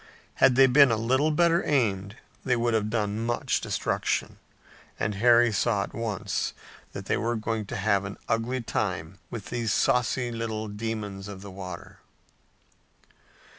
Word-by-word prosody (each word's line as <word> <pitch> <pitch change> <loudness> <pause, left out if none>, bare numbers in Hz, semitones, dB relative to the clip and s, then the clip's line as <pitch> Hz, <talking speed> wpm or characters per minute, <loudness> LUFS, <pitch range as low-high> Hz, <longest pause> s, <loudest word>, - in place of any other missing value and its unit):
Had 130 - +6
they 135 +1 +7
been 135 +1 +6
a 115 - +1
little 130 +7 +2
better 170 +2 +3
aimed 105 -8 0 0.3
they 125 - +2
would 120 0 0
have 105 -1 +1
done 105 -1 -1
much 120 +1 0
destruction, - - -1 0.6
and 105 - 0
Harry 120 +3 +5
saw 105 -1 +1
at - - -9
once 110 -4 -2 0.4
that - - -7
they - - 0
were 120 +1 -1
going 110 -1 -3
to - - -5
have 100 0 +1
an 95 +1 -6
ugly 115 +3 0
time 90 -5 -3
with 115 -4 -7
these 120 -3 -1
saucy 125 +1 +1
little 110 -2 -3
demons 105 -2 -5
of 100 -1 -8
the 100 - -9
water. 95 -2 -9
115 Hz, 155 wpm, -27 LUFS, 100-120 Hz, 0.6 s, they